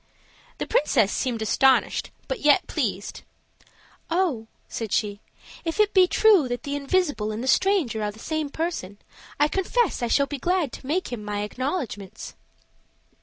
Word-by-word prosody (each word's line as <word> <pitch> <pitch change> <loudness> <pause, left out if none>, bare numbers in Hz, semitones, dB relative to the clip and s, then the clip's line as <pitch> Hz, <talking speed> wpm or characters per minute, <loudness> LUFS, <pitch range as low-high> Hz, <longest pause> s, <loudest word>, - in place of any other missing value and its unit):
The - - -3
princess 235 -8 +2
seemed 235 -4 -1
astonished, 265 +4 +3 0.2
but - - -3
yet 295 -4 +4
pleased. - - -3 0.9
"Oh," 330 -11 0 0.2
said 225 -3 -5
she, 205 -2 0 0.4
"if 330 +3 -3
it 420 -1 +3
be 370 -2 +6
true 400 -8 +5
that 245 -1 -4
the 285 0 -3
invisible 285 -6 0
and 215 +3 -4
the - - -4
stranger 315 - +2
are 210 - -1
the 210 - -10
same 310 +4 -3
person, 300 - -4 0.4
I 295 - +5
confess 385 - 0
I 240 - 0
shall 280 +4 +3
be 285 0 -6
glad 350 -3 0
to 260 - -9
make 330 -2 -1
him 220 -3 -5
my 205 0 -3
acknowledgments." 220 - -4
280 Hz, 160 wpm, -25 LUFS, 220-345 Hz, 0.9 s, be